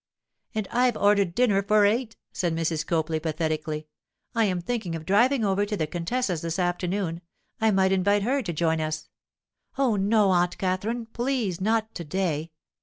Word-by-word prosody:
'And 215 -3 -1
I've 245 -1 +2
ordered 200 -4 +3
dinner 215 -6 +3
for 205 +1 +4
eight!' 225 +2 0 0.2
said 170 -3 -1
Mrs. 165 -1 -1
Copley, 160 -1 0
pathetically. 155 -1 -2 0.5
'I 230 -2 +3
am 185 -3 0
thinking 185 -3 -3
of 160 -1 -7
driving 235 +5 +3
over 195 0 +2
to 205 0 -2
the 155 - 0
contessa's 175 +2 -2
this 165 +1 -3
afternoon—I 180 +3 -2
might 190 -2 +3
invite 200 +2 +2
her 270 +5 +1
to 200 - -4
join 160 0 0
us.' 155 0 -4 0.7
'Oh, 255 -6 +2
no, 205 0 +3
Aunt 175 -1 +2
Katherine! 200 +6 -1
Please, 230 -6 -2
not 220 +2 0
to 170 - -6
day. 165 -2 -2
190 Hz, 165 wpm, -26 LUFS, 165-220 Hz, 0.7 s, for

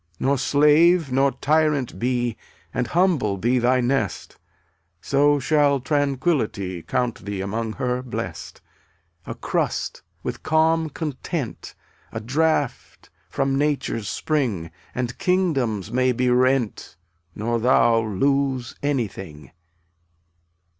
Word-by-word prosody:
161 135 - 0
Nor 140 - +3
slave 150 +3 +4
nor 135 +2 +3
tyrant 150 -3 +1
be 120 -1 0 0.4
And 125 - -1
humble 165 - +1
be 120 +6 +1
thy 125 +2 +3
nest, 120 -4 -2 0.6
So 145 +7 +3
shall 145 0 +3
Tranquillity 135 - -1
Count 120 +6 -2
thee 100 -1 -4
among 110 +3 -3
her 125 +1 -2
blest. 130 -2 -6 0.7
A - - -5
crust, - - -2 0.2
with - - -4
calm 160 0 +2
content, 150 -2 -5 0.4
A 110 - -4
draught 145 +3 -1 0.2
from 135 0 0
nature's 140 -7 -1
spring, 115 - -1 0.2
And 125 -1 -3
kingdoms 140 - 0
may 130 0 +2
be 125 +1 +1
rent 125 -2 +1 0.4
Nor 115 +2 -1
thou 115 -1 +4
lose 130 +4 0
anything. 100 - -3
130 Hz, 110 wpm, -23 LUFS, 115-145 Hz, 0.7 s, slave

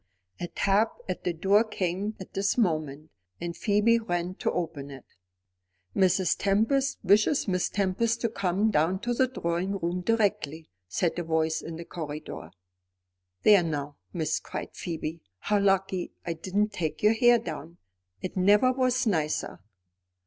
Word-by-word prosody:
A 175 - -3
tap 200 +5 +1
at - - -4
the 180 - +2
door 195 +6 +3
came 200 0 -2
at 190 - -10
this 200 +4 0
moment, 155 - -1 0.3
and 170 0 -4
Phoebe 220 +2 +3
ran 175 -4 -2
to - - 0
open 160 -5 -4
it. 135 -2 -11 0.9
"Mrs. 185 -2 +3
Tempest 225 +8 +2
wishes 210 +9 +3
Miss 185 -2 +1
Tempest 205 +4 0
to 230 - +1
come 200 +1 0
down 165 +4 +2
to 240 0 -1
the 260 +2 +3
drawing 185 -4 -2
room 175 0 -2
directly," 200 -7 0 0.2
said 170 - -1
a - - -2
voice 160 -1 0
in 165 - -7
the 170 +1 -7
corridor. 150 - -7 0.9
"There 205 -3 +7
now, 145 -3 -3
miss," 160 -3 -1
cried - - -6
Phoebe, 165 -1 -5 0.2
"how 205 - +1
lucky 195 -2 +1
I 170 - -1
didn't 195 +6 0
take 165 -3 -3
your 210 +1 +6
hair 240 +1 +5
down. 165 -3 -7 0.5
It 185 - -4
never 205 +7 +5
was 255 0 +1
nicer." 160 -8 -1
185 Hz, 150 wpm, -27 LUFS, 165-210 Hz, 0.9 s, There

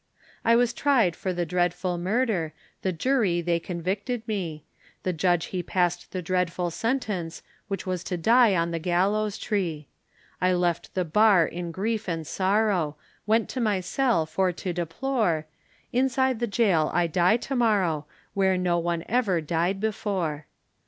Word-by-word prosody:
I 230 - +5
was 240 0 +3
tried 235 - +2
for 185 - -3
the 175 -1 -1
dreadful 175 +1 0
murder, 190 - 0 0.3
The 190 - 0
Jury 195 -1 +1
they 170 0 0
convicted 195 +8 -3
me, 170 -8 -3 0.4
The 185 - 0
Judge 175 0 +1
he 180 - 0
passed 175 0 -1
the 185 -1 -4
dreadful 180 -1 -1
sentence, 210 -7 -2 0.2
Which 195 -1 -4
was 185 -2 -2
to 180 - -2
die 225 +3 +5
on 170 -1 0
the 165 - -2
gallows 195 +5 +1
tree; 170 - -2 0.5
I 185 0 +3
left 175 -1 -1
the 185 -1 +1
Bar 195 +1 +5
in 175 +1 -5
grief 215 +3 -2
and 165 -2 -3
sorrow, 190 -4 +1 0.3
Went 220 +1 +3
to 255 - -3
my 210 -4 +1
cell 225 -1 +1
for 185 +3 0
to 180 +1 -4
deplore, 175 -1 -1 0.5
Inside 260 -1 +2
the 240 - 0
Gaol 195 -8 +2
I 175 - +2
die 175 +6 +3
to 270 +3 -4
morrow, 190 - +1 0.3
Where 190 -1 +2
no 175 -1 +1
one 170 0 -1
ever 215 -7 +1
died 170 +4 -1
before. 190 -8 -2
185 Hz, 160 wpm, -26 LUFS, 170-220 Hz, 0.5 s, I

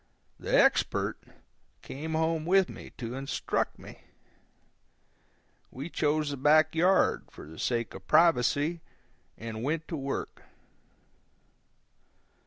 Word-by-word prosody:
The - - +2
Expert - - +2 0.6
came 160 +4 -6
home 160 0 0
with 190 0 +4
me - - -10
to 120 -1 -5
instruct 135 +1 -2
me. - - -12 1.7
We 140 +6 -7
chose 150 -1 0
the 140 - -4
back 155 +3 +4
yard, 180 +4 +3
for - - -12
the 80 +2 -12
sake 120 -2 -1
of 95 0 -11
privacy, 165 +1 +3 0.6
and 110 -1 -6
went 155 +5 -2
to 165 - -3
work. 140 -2 -4
150 Hz, 110 wpm, -29 LUFS, 130-160 Hz, 1.7 s, with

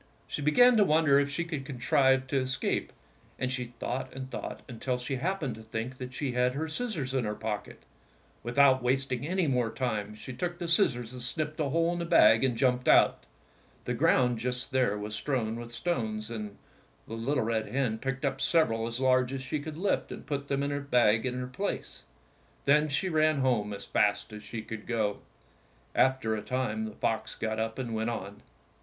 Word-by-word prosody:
She - - -4
began 230 - +6
to 210 - +6
wonder 155 -5 +4
if 140 0 +1
she 140 +5 -1
could 160 -5 -4
contrive 130 0 +2
to 135 +1 0
escape, 130 0 -1 0.5
and 130 0 -1
she 125 -1 -2
thought 130 +2 -3
and 130 0 -6
thought - - -6
until 125 +1 -2
she 125 +2 -3
happened 160 -3 -1
to 110 - -10
think 110 +4 -5
that 125 0 -6
she 140 -2 -2
had 125 +1 +2
her 160 +3 -2
scis 220 +7 -2
sors 135 -4 -3
in 130 -2 +1
her 105 -1 -2
pocket. 105 -2 -5 0.6
Without 130 +2 +4
wasting 130 +1 0
any 185 +1 +1
more 125 -5 +1
time 110 -4 -2
she 125 +5 -8
took 175 +6 -3
the 175 -1 -4
scissors 130 - +2
and 125 - -7
snipped 150 +5 -3
a 150 -3 +1
hole 165 +4 +2
in 175 - -3
the 170 - -2
bag 115 -7 +6
and 125 -3 +1
jumped 125 0 +2
out. - - +5 0.6
The - - -1
ground 125 -3 +3
just 125 +3 -3
there 125 -5 +2
was 105 +1 -5
strewn 115 -1 -1
with 120 0 -8
stones, 115 -6 -2
and 105 -3 -6 0.5
the - - -7
little 125 +3 0
red 110 -1 -1
hen 125 -5 -1
picked 135 +2 -3
up 135 0 -1
sev 165 -5 +3
eral 115 0 -2
as 115 +1 -4
large 130 -1 +3
as 135 -1 -4
she 150 +3 -2
could 155 +1 -7
lift 195 +3 0
and - - -8
put 140 -1 -3
them 140 0 0
in 140 - -1
the 145 - -1
bag 125 -4 +3
in 125 - -2
her 125 0 -3
place. 195 +11 -4 0.6
Then 150 +2 +4
she 145 +7 0
ran 155 -4 +2
home 115 -6 +1
as 100 - -6
fast 100 0 +1
as 105 - -7
she 110 +1 -6
could 110 -1 -8
go. 110 -4 0 0.7
After 130 -4 +2
a 105 - -3
time 110 -4 -2
the 110 - -6
fox 110 -1 -1
got 110 -1 -2
up 110 0 -2
and 125 -3 -3
went 110 +1 -1
on. 100 -3 -6
130 Hz, 210 wpm, -29 LUFS, 115-140 Hz, 0.7 s, began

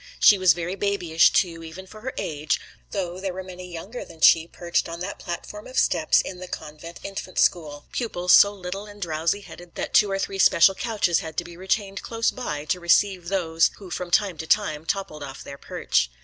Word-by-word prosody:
She 205 - +7
was 185 -4 +6
very 175 +2 -4
babyish 195 -5 +3
too, 170 -3 +1
even 165 +4 -9
for 215 +3 -13
her 260 +3 -4
age, 155 +1 -1 0.3
though 185 -3 -3
there 190 -1 -4
were 190 - -5
many 180 -1 -10
younger 195 +9 -7
than 165 -1 -14
she 160 0 +6
perched 170 0 -2
on 165 0 -6
that 195 +3 -5
platform 210 +4 -7
of 255 - -8
steps - - +3
in 185 -1 -7
the 185 - -7
Convent 160 +1 -8
Infant 195 -2 -7
School 150 -5 +1
pupils, 180 -7 0
so 200 - +8
little 195 +1 -6
and 205 0 -13
drowsy 165 +2 -1
headed 175 -3 -13
that - - -4
two 205 - +5
or 195 - 0
three 195 0 -3
special 190 +1 +6
couches 210 -6 0
had 160 -1 -8
to - - 0
be 170 0 -11
retained 195 +2 -2
close 230 0 0
by 150 -12 -5
to 180 - -1
receive 180 +1 +2
those 165 -4 +2
who 190 -3 -11
from 180 0 -4
time 185 -3 +1
to 160 - -5
time 160 -7 +1
toppled 190 -6 -3
off 135 -1 -8
their 140 0 -9
perch. - - 0
180 Hz, 210 wpm, -24 LUFS, 165-195 Hz, 0.3 s, so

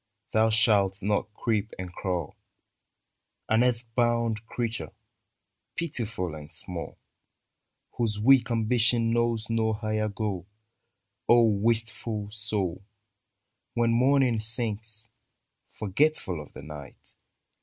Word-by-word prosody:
Thou 110 +1 +4
shalt 100 -3 +3
not 105 +1 0
creep 110 -2 -1
and 90 -1 -6
crawl 90 -4 -3 0.6
— - - -53
An 110 +2 +4
earth 125 -1 +1
bound 115 -2 +1
creature, 115 -1 -3 0.8
pitiful 115 - -3
and 75 0 -9
small, 85 0 -4 1.0
Whose 110 -3 0
weak 130 +4 +5
ambition 115 0 +2
knows 115 -1 +1
no 115 -1 +1
higher 110 0 -1
goal! 100 -3 -3 0.8
O 120 0 +7
wistful 110 -1 0
soul. 105 -5 -2 0.9
When 120 -1 +3
morning 130 -1 +3
sings, 110 0 -3 0.6
Forgetful 105 - 0
of 75 - -12
the - - -10
night. 75 -3 -11
110 Hz, 105 wpm, -27 LUFS, 100-115 Hz, 1.0 s, O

